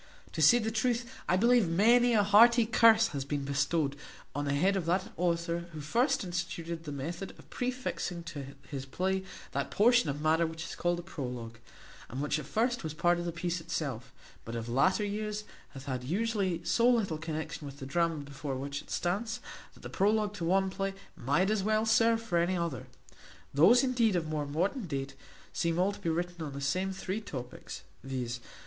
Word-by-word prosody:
To - - -3
say 240 - +7
the 220 -2 -1
truth, 235 +2 0 0.2
I 180 - +4
believe 235 -2 +4
many 235 +7 +5
a 205 - +5
hearty 230 +4 +6
curse 225 0 +5
hath 140 -2 -4
been 140 -1 -2
devoted 145 +1 0 0.4
on 145 0 -2
the 140 0 0
head 190 +7 +3
of 180 -4 -2
that 185 +3 0
author 170 0 -1
who 155 - -6
first 245 - +1
instituted 170 -2 -4
the 150 - -5
method 165 +7 -5
of - - -16
prefixing 250 -8 -3
to 140 -4 -7
his 135 -1 -6
play 190 +6 -1 0.3
that 140 0 -2
portion 240 -5 +4
of 140 +1 -3
matter 160 +2 +2
which 160 0 -6
is - - -6
called 175 0 0
the 175 - -6
prologue; 125 -8 -6 0.5
and 130 - -5
which 150 +1 0
at 145 - -8
first 240 +8 0
was 155 -1 -4
part 175 +1 +2
of 175 - -4
the 170 - -1
piece 170 0 -2
itself, 145 -8 -4 0.3
but 115 - -6
of 115 0 -4
latter 185 - +2
years 210 +1 -3 0.3
hath 135 0 -8
had 130 -2 -3
usually 190 - -1
so 235 +1 +3
little 205 -10 +1
connexion 155 -1 -5
with 140 0 -9
the 135 - -7
drama 165 +4 +1
before 140 -1 -5
which 140 +2 -4
it - - -19
stands, 220 +7 -1 0.4
that - - -17
the - - -5
prologue 210 +1 +1
to 185 - -6
one 190 +3 +2
play 195 0 -3 0.2
might 175 - +1
as 215 -2 +1
well 215 +2 +1
serve 225 +1 +4
for 210 -7 0
any 175 +2 +1
other. 170 -8 -3 0.7
Those 205 - +6
indeed 240 -6 +2
of 170 -2 0
more 150 -2 -2
modern 185 - -1
date, 140 -2 -3 0.4
seem 170 0 0
all 185 +3 +3
to - - -10
be 165 - -2
written 175 +1 -2
on 145 -3 -5
the 140 - -5
same 185 +8 0
three 190 +2 -4
topics, 125 - -8 0.2
viz. 125 -3 -3
175 Hz, 200 wpm, -31 LUFS, 145-210 Hz, 0.7 s, say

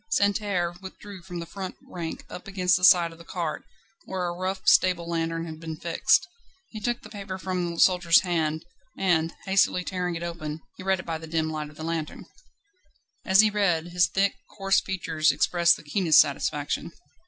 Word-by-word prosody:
Santerre 200 -8 +1
withdrew 195 0 -10
from 175 0 -8
the 170 - -5
front 185 +2 -7
rank, 170 -2 -6
up 180 - -9
against 185 -2 +2
the 180 - -2
side 175 -3 +6
of 165 - -15
the - - -11
cart, 165 -2 -4 0.4
where 185 -1 -3
a 175 - -2
rough 185 +2 -4
stable 180 -2 +4
lantern 165 0 -2
had 160 -1 -8
been 160 -1 -6
fixed. 170 0 +2 0.4
He 220 - -7
took 240 +3 -2
the - - -11
paper 200 -3 -6
from 180 -2 -3
the - - -7
soldier's 175 -3 +5
hand, 160 -3 -1 0.3
and, 165 -3 +1
hastily 190 -2 +2
tearing 180 -1 -3
it 165 - -5
open, 160 -2 -5
he - - -11
read 190 0 +1
it - - -8
by 165 -1 -3
the 160 - -9
dim 160 0 -1
light 155 -1 -4
of 150 - -17
the 155 - -7
lantern. 160 -2 -4 1.0
As 190 -1 +6
he 215 -1 +3
read, 175 -5 +1
his 175 0 +3
thick, 195 +1 +1 0.2
coarse 195 -1 +2
features 165 -5 0
expressed 170 +4 +3
the - - -14
keenest 160 +1 +4
satisfaction. 145 +2 0
175 Hz, 190 wpm, -26 LUFS, 165-190 Hz, 1.0 s, side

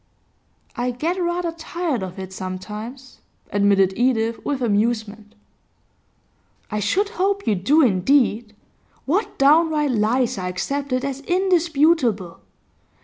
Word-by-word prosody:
'I 245 +1 -1
get 345 +7 -1
rather 345 0 -1
tired 330 - -3
of 185 0 -6
it 190 0 -7
sometimes,' 210 +8 -7 0.3
admitted 200 -2 +3
Edith 230 -2 0
with 285 -2 -2
amusement. 215 -1 -1 1.4
'I 210 - -1
should 370 - 0
hope 400 -1 -1
you 220 - +2
do, 270 - +3
indeed. 220 0 +2 0.5
What 370 +11 -1
downright 300 0 +3
lies 230 0 +1
are 180 - -3
accepted 265 +8 -2
as 275 -1 -3
indisputable! 320 - +1
250 Hz, 110 wpm, -22 LUFS, 210-315 Hz, 1.4 s, admitted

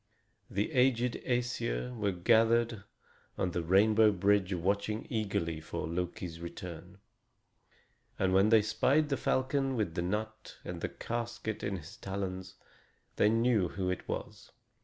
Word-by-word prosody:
The 105 +2 -1
aged 125 -3 +2
Æsir 120 - -1
were 105 -3 0
gathered 115 +3 +3 0.5
on 90 - 0
the 85 - -1
rainbow 105 +5 +5
bridge 100 0 +2
watching 100 +4 -1
eagerly 95 -8 -1
for 80 - -5
Loki's 85 0 -4
return; 85 +2 -8 1.2
and 95 -1 +1
when 95 +3 +5
they 110 -2 +6
spied 145 +8 +2
the 140 - +1
falcon 135 0 0
with 105 -8 -1
the 85 - -2
nut 110 +4 -4
and - - -5
the - - -2
casket 120 -2 -4
in 100 -1 -2
his 90 +7 -11
talons, 95 -2 -5 0.6
they 105 - +5
knew 115 -4 +3
who 90 +1 -2
it 90 - -5
was. - - -6
105 Hz, 140 wpm, -31 LUFS, 90-115 Hz, 1.2 s, they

